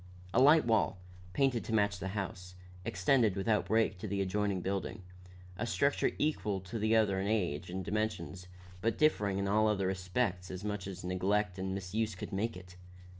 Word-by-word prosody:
A 125 - +4
light 150 +2 +7
wall, 115 -4 +2 0.4
painted 135 -2 +2
to 115 - -4
match 100 -3 +2
the 95 - -3
house, 90 -2 -5 0.3
extended 100 +4 +2
without 105 +2 +1
break 110 -4 +2
to 105 - -5
the 100 0 -2
adjoining 100 0 0
building, 95 +2 -3 0.6
a 115 - -1
structure 140 +4 +2
equal 110 -10 0
to 95 +5 -5
the 110 +1 +2
other 105 -4 +3
in 95 - -1
age 90 -7 -1
and 95 0 -4
dimensions, 95 -4 -3 0.3
but 115 +2 0
differing 105 -11 +2
in 100 0 -1
all 110 +2 +3
other 100 -3 +1
respects 95 0 -1
as 95 +1 -6
much 105 -2 -3
as 95 -2 -7
neglect 95 +1 0
and 95 0 -2
misuse 100 +3 -2
could 95 - -7
make 110 +2 -1
it. 90 0 -13
100 Hz, 180 wpm, -33 LUFS, 95-110 Hz, 0.6 s, light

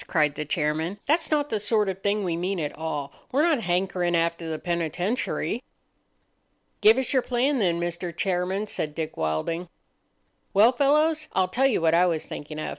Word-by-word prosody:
cried 150 -3 +2
the 150 - -4
chairman. 155 +4 -1
"That's 320 +3 +2
not 295 -1 0
the 215 - 0
sort 210 0 +1
of 190 0 -3
thing 205 +1 0
we 175 -3 -1
mean 180 +2 -2
at 150 -2 -3
all. 150 -3 -4 0.2
We're 280 +4 +3
not 320 -5 +3
hankering 180 -1 0
after 170 0 0
the 160 - -2
penitentiary." 175 - -2 1.2
"Give 220 +3 +7
us 265 0 -1
your 260 - +4
plan, 255 +3 +1
then, 175 -5 +1
Mr. 175 0 -3
Chairman," 190 +2 -1
said 150 -7 -3
Dick 160 -2 -4
Wilding. 80 - -2 0.9
"Well, 215 +5 +7
fellows, 305 +4 +2
I'll 185 -1 +2
tell 265 +7 +3
you 250 - +1
what 165 -1 +3
I 175 +2 +5
was 165 -3 -1
thinking 150 +1 -7
of. 155 - -3
180 Hz, 185 wpm, -25 LUFS, 165-230 Hz, 1.2 s, Give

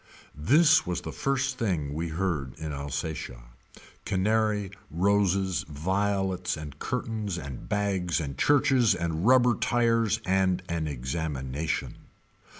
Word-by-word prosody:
This 150 - +5
was 90 0 -2
the - - -6
first 135 -1 -1
thing 80 -10 -1
we 80 +3 -2
heard 80 -6 -2
in 80 -1 -5
Alsatia. 70 -3 -5 0.6
Canary, 105 0 +1 0.2
roses, 95 -2 +1
violets 95 +2 -1
and 75 -2 -8
curtains 110 -6 -3
and 70 -6 -7
bags 95 -5 0
and 70 -4 -4
churches 135 - +3
and 85 +2 -1
rubber 125 -1 +6
tires 115 -1 +1
and 95 -1 +1
an 85 -2 -2
examination. 70 +1 -3
95 Hz, 115 wpm, -27 LUFS, 80-110 Hz, 0.6 s, rubber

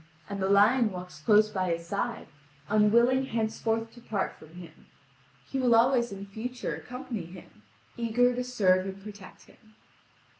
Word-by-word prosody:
And 200 -1 -5
the 190 - 0
lion 215 +3 +4
walks 180 -3 -8
close 215 +5 +4
by 185 -3 -2
his 170 0 -6
side, 205 +6 -3 0.4
unwilling 235 +5 +3
henceforth 225 0 -2
to 240 - -15
part 205 -4 -2
from 155 +2 -16
him: 170 -3 -13 0.6
he 270 - -3
will 245 -3 +4
always 240 0 +3
in 200 0 -7
future 245 +5 -5
accompany 250 -7 -6
him, 185 +4 -14 0.4
eager 240 +1 +2
to 250 +1 -2
serve 195 -7 +2
and 195 0 -7
protect 205 -3 -11
him. 215 -2 -23
215 Hz, 155 wpm, -28 LUFS, 195-240 Hz, 0.6 s, lion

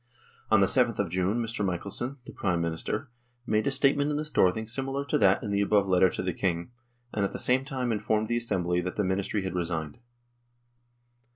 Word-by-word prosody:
On 110 -2 +5
the - - +6
7th 120 0 +3
of 100 -5 -1
June 95 +4 0
Mr. 115 -2 -2
Michelsen, 100 +8 -2
the - - -9
Prime 90 -5 -1
Minister, 85 +9 -3 0.3
made 110 0 +1
a - - +4
statement 140 +1 +3
in 150 - -1
the 155 - -2
Storthing 110 -7 +2
similar 135 +4 -3
to 140 - 0
that 100 +4 +4
in 105 - -3
the 100 0 +1
above 100 -1 +2
letter 95 0 +4
to - - -4
the 90 -1 -1
King, 85 +3 -2 0.4
and 100 - 0
at 100 - -1
the - - -3
same 130 +1 +2
time 130 -3 -2
informed 110 0 0
the 120 - 0
Assembly 90 -7 0
that 90 +1 -4
the 105 - 0
Ministry 95 +2 -1
had 95 - -3
resigned. 80 -3 -3
105 Hz, 205 wpm, -28 LUFS, 90-120 Hz, 0.4 s, the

